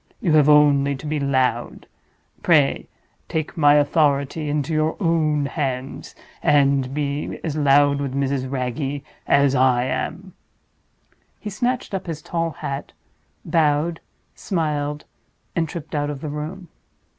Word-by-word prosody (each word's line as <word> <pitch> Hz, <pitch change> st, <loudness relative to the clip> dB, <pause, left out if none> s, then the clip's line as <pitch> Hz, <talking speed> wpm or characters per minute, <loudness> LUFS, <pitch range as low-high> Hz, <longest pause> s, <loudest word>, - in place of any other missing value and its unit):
You 165 Hz, -, +1 dB
have 150 Hz, -1 st, +5 dB
only 140 Hz, -1 st, +5 dB
to 135 Hz, -, -10 dB
be 150 Hz, 0 st, -1 dB
loud. 130 Hz, -4 st, 0 dB, 0.6 s
Pray 150 Hz, -5 st, +3 dB, 0.4 s
take 155 Hz, -1 st, -3 dB
my 145 Hz, -2 st, +5 dB
authority 145 Hz, 0 st, +1 dB
into 145 Hz, +1 st, -1 dB
your 155 Hz, +1 st, 0 dB
own 155 Hz, -5 st, +1 dB
hands, 135 Hz, -3 st, -4 dB, 0.3 s
and 140 Hz, -3 st, +3 dB
be 145 Hz, 0 st, -3 dB
as 155 Hz, -3 st, -3 dB
loud 145 Hz, -1 st, +4 dB
with 135 Hz, -2 st, -3 dB
Mrs. 135 Hz, -1 st, -1 dB
Wragge 135 Hz, +2 st, -3 dB, 0.2 s
as 140 Hz, -1 st, +4 dB
I 130 Hz, -2 st, +3 dB
am!" 180 Hz, +8 st, -4 dB, 1.1 s
He 210 Hz, -, -6 dB
snatched 245 Hz, +2 st, -2 dB
up 190 Hz, -1 st, -3 dB
his 160 Hz, -2 st, -5 dB
tall 165 Hz, -1 st, -1 dB
hat, 140 Hz, -3 st, -6 dB, 0.5 s
bowed, 160 Hz, +1 st, +1 dB, 0.3 s
smiled, 150 Hz, -4 st, -2 dB, 0.5 s
and 165 Hz, -2 st, 0 dB
tripped 165 Hz, -1 st, -8 dB
out 145 Hz, -1 st, -1 dB
of 145 Hz, -2 st, -6 dB
the 155 Hz, -, -4 dB
room. 155 Hz, +5 st, -6 dB
145 Hz, 135 wpm, -22 LUFS, 140-160 Hz, 1.1 s, have